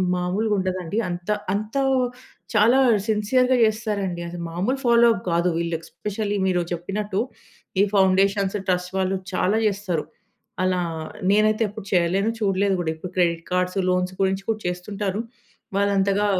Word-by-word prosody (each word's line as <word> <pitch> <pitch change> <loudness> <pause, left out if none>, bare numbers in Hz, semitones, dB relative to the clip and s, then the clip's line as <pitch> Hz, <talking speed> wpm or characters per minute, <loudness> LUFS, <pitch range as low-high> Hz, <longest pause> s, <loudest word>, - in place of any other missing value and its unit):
మామూలుగా 190 +5 0
ఉండదండి. 185 0 -2
అంత 175 +2 -6 0.2
అంత 215 +3 -3 0.8
చాలా 225 +5 +5 0.3
సిన్సెయర్‌గా 250 +4 +2
చేస్తారండి. 210 -5 -1
అది 175 - -7
మామూలు 185 +11 -1
ఫాలో 235 0 +6
అప్ 200 - -6
గాదు. 170 +1 +2
వీళ్ళు 170 0 -1
ఎస్పెషల్లీ 205 +5 -4
మీరు 180 -1 +2
చెప్పినట్టు 195 +4 -2 0.6
ఈ - - +6
ఫౌండేషన్స్, 195 +1 +3
ట్రస్ట్ 180 0 0
వాళ్ళు 190 0 +1 0.2
చాలా 185 +3 +2
జేస్తారు. 195 -6 -1 0.6
అలా 185 -1 +1 0.5
నేనైతే 215 +2 +3
ఎప్పుడు 210 0 -9
చేయలేను 185 +4 +2
చూడలేదు 195 -1 +1
కూడా 160 - -1
ఇప్పుడు 175 +3 -8
క్రెడిట్ 170 -2 +1
కార్డ్స్, 180 +1 0
లోన్స్ 180 0 0
గురించి 190 0 +1
కూడా 220 -1 -1
చేస్తుంటారు. 195 +3 -3 0.6
వాళ్ళు 200 0 +2
అంతగా 200 +1 +2
195 Hz, 135 wpm, -23 LUFS, 180-210 Hz, 0.8 s, ఫాలో